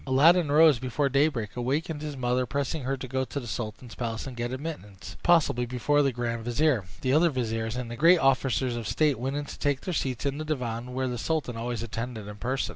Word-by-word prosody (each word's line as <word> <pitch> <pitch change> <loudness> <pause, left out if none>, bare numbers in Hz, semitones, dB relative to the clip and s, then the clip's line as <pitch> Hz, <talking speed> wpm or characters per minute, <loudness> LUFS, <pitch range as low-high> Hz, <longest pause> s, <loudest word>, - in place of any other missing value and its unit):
Aladdin 155 +4 +5
rose 155 -3 +6
before 130 +3 0
daybreak, 135 -7 +1
awakened 145 +5 -2
his 150 -2 -5
mother, 125 0 0
pressing 140 +3 -2
her 135 +1 -1
to 130 - -6
go 130 +1 -1
to 140 - -4
the 125 - -8
sultan's 120 +1 -5
palace, 115 -2 -4
and 130 -2 -7
to 120 - -5
get 120 +1 -2
admittance, 130 - -7
if - - -18
possible, 165 -8 +3
before 125 +4 +2
the 140 -2 +2
grand 115 -1 -3
vizier, 120 -2 +1 0.2
the 130 0 +1
other 165 +3 +5
viziers, 115 -4 -2
and 125 -2 -4
the - - -4
great 165 +8 +6
officers 130 -3 +2
of 115 -2 -4
state 150 -1 +2
went 135 +3 -2
in 145 0 -2
to - - -9
take 145 -2 0
their 185 - -3
seats 130 -4 -2
in 140 +1 -1
the - - -2
divan, 125 -4 -3
where 130 0 0
the 125 -2 -3
sultan 155 -4 -1
always 115 0 -3
attended 115 -1 -5
in 105 0 -8
person. 130 +5 -1
130 Hz, 235 wpm, -27 LUFS, 120-145 Hz, 0.2 s, rose